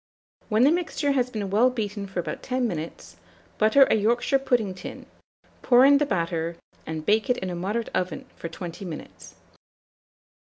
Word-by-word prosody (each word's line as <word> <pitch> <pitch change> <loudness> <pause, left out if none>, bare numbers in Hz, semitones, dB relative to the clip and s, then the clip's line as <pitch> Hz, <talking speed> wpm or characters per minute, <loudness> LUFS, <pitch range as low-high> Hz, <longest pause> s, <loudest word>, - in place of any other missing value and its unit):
When 220 +2 +3
the 280 - +6
mixture 320 -4 0
has 255 -3 +1
been 205 -5 -4
well 230 +5 +4
beaten 210 -4 -4
for 190 -2 -4
about 175 - -4
10 255 -1 -1
minutes, 155 - -6 0.4
butter 220 +6 +6
a - - +2
Yorkshire 240 +5 +2
pudding 240 -7 0
tin, 185 - -9 0.6
pour 250 +1 +6
in 280 0 +6
the 295 - +1
batter, 170 -3 -2 0.3
and 160 -1 -5
bake 215 +4 +2
it 250 - +3
in 185 -1 -4
a - - -4
moderate 205 +6 -2
oven 180 -3 -2
for 170 - -6
20 170 +2 -7
minutes. 170 -5 -9
215 Hz, 170 wpm, -25 LUFS, 180-250 Hz, 0.6 s, the